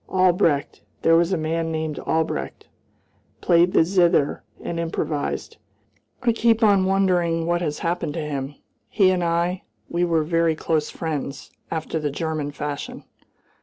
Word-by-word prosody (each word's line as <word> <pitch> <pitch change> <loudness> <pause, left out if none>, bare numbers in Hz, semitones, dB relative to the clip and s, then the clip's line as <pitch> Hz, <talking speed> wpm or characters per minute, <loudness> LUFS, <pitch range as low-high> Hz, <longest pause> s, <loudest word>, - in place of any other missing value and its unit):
Albrecht 180 -6 +2 0.2
there 165 - +5
was 170 +2 +3
a 185 - +1
man 165 +1 -1
named 155 -1 -3
Albrecht 155 - -2 0.7
played 175 +1 +4
the - - +5
zither 170 -5 +2 0.2
and 170 - -4
improvised; 160 -3 -3 0.7
I 240 - +4
keep 230 0 +2
on 200 -3 +5
wondering 180 -4 +2
what 175 +1 0
has 150 -3 -2
happened 170 -3 -2
to 165 - -2
him. 140 -1 -4 0.3
He 190 -3 +4
and 180 -1 0
I 170 +2 0 0.3
we 175 +1 0
were 165 -2 +2
very 165 0 +1
close 155 -1 -1
friends, 150 -4 -5 0.2
after 160 0 -3
the 150 -1 -1
German 155 0 -3
fashion." 145 0 -5
165 Hz, 145 wpm, -23 LUFS, 155-175 Hz, 0.7 s, there